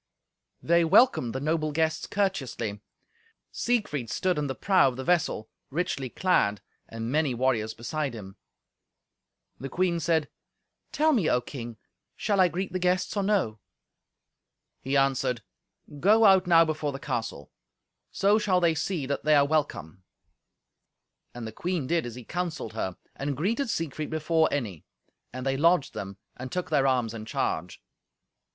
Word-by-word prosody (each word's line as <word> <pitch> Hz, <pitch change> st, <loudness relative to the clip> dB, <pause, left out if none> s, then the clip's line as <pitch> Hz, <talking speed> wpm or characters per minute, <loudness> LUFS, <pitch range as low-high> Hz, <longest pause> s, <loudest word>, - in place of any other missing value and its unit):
They 170 Hz, +1 st, +4 dB
welcomed 170 Hz, -, +4 dB
the -, -, -1 dB
noble 155 Hz, +1 st, 0 dB
guests 160 Hz, +1 st, 0 dB
courteously. 135 Hz, -, -2 dB, 0.7 s
Siegfried 175 Hz, -, -1 dB
stood 180 Hz, +4 st, 0 dB
in 145 Hz, -, -1 dB
the 130 Hz, -, -3 dB
prow 190 Hz, -7 st, +4 dB
of 130 Hz, -, -2 dB
the 130 Hz, -, -5 dB
vessel, 165 Hz, -9 st, +1 dB, 0.2 s
richly 140 Hz, -4 st, -2 dB
clad, 110 Hz, -, +1 dB, 0.3 s
and 115 Hz, +1 st, -5 dB
many 150 Hz, -3 st, +1 dB
warriors 115 Hz, -3 st, 0 dB
beside 130 Hz, +3 st, -3 dB
him. 95 Hz, -3 st, -9 dB, 1.2 s
The 135 Hz, -, -6 dB
queen 175 Hz, 0 st, 0 dB
said, 160 Hz, -1 st, +1 dB, 0.6 s
"Tell 310 Hz, +1 st, +3 dB
me, 205 Hz, -, +2 dB
O 125 Hz, -, +3 dB
King, 120 Hz, -3 st, -8 dB, 0.4 s
shall 205 Hz, -2 st, 0 dB
I 185 Hz, -, +6 dB
greet 180 Hz, +3 st, -4 dB
the 185 Hz, -, -1 dB
guests, 180 Hz, +2 st, 0 dB
or 200 Hz, -, +1 dB
no?" 190 Hz, -, 0 dB, 1.2 s
He 135 Hz, +2 st, 0 dB
answered, 135 Hz, -3 st, +1 dB, 0.6 s
"Go 215 Hz, +7 st, +5 dB
out 190 Hz, -2 st, +6 dB
now 165 Hz, -1 st, +6 dB
before 155 Hz, -2 st, -2 dB
the 135 Hz, -, -5 dB
castle. 120 Hz, -, -4 dB, 0.6 s
So 205 Hz, +2 st, +3 dB
shall 195 Hz, -4 st, +2 dB
they 170 Hz, -2 st, +3 dB
see 160 Hz, -2 st, -2 dB
that 140 Hz, +1 st, -3 dB
they 155 Hz, +1 st, +4 dB
are 140 Hz, -1 st, +5 dB
welcome." 140 Hz, -, -2 dB, 1.3 s
And 120 Hz, -2 st, -6 dB
the 110 Hz, -, -5 dB
queen 170 Hz, +4 st, -2 dB
did 165 Hz, -1 st, 0 dB
as 120 Hz, -, -8 dB
he 125 Hz, -, -9 dB
counselled 170 Hz, -6 st, -4 dB
her, 95 Hz, -5 st, -3 dB, 0.2 s
and 140 Hz, -1 st, -3 dB
greeted 230 Hz, -, 0 dB
Siegfried 155 Hz, -5 st, -3 dB
before 160 Hz, +1 st, +2 dB
any. 105 Hz, -, -3 dB, 0.5 s
And 130 Hz, +1 st, -6 dB
they 135 Hz, 0 st, 0 dB
lodged 165 Hz, 0 st, +3 dB
them, 100 Hz, 0 st, -6 dB, 0.2 s
and 130 Hz, 0 st, -7 dB
took 180 Hz, -2 st, -3 dB
their 140 Hz, -3 st, +3 dB
arms 125 Hz, -4 st, +1 dB
in 110 Hz, -1 st, -7 dB
charge. 90 Hz, -5 st, -3 dB
150 Hz, 155 wpm, -27 LUFS, 125-180 Hz, 1.3 s, I